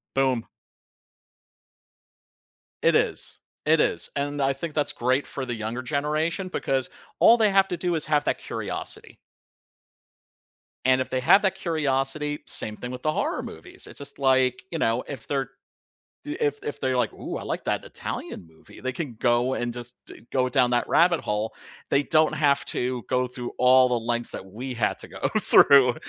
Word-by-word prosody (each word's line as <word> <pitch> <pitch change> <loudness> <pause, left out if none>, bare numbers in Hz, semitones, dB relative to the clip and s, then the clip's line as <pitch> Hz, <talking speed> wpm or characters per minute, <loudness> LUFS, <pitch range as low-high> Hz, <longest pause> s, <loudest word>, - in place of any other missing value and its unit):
Boom. 130 -3 +1 2.4
It - - +4
is - - -1 0.3
It 155 +1 +4
is - - 0
and 145 0 -2
I 135 0 +2
think 155 +3 -6
that's 150 -1 0
great 130 +3 +1
for 135 -2 -5
the 120 - -3
younger 110 +3 -4
generation 155 +6 -1
because 135 -6 -1 0.3
all 235 - +7
they 215 -3 +4
have 195 0 +4
to 175 - -2
do 175 -1 -1
is 155 - -2
have 150 -1 +2
that - - +1
curiosity - - -6 1.7
And 130 0 +4
if 130 - -4
they 130 - 0
have 140 +10 +6
that 190 -2 +2
curiosity, 150 -4 -1
same 105 -1 -5
thing 125 - -6
with 125 - -7
the 155 - +2
horror - - -1
movies. - - -10
It's - - -12
just 140 0 -7
like, 130 0 +3
you 165 - -3
know, 115 +2 +1
if 130 -6 -8
they're 135 -3 -1 0.8
if 145 0 -1
if 145 - -6
they're 130 -1 +1
like, 125 - 0
"Ooh, - - -5
I - - -7
like - - -3
that - - -1
Italian 85 - -6
movie." 80 - -17
They 130 - -2
can 135 -2 -5
go 120 +2 +2
and 120 -2 -2
just 120 0 -7
d 115 - -14
go 130 -1 +1
down 125 -1 +3
that 120 0 +1
rabbit 170 -1 +4
hole. 105 +1 -2 0.4
They 140 - +3
don't 155 +1 +3
have 140 -2 +2
to 125 -1 -2
go 125 -1 +1
through 125 -1 -7
all 130 +1 +6
the 125 -1 0
lengths 120 +1 -2
that - - -7
we 120 +7 -6
had 115 -3 0
to - - -9
go - - -3
through, 130 -3 +6
130 Hz, 180 wpm, -25 LUFS, 125-150 Hz, 2.4 s, all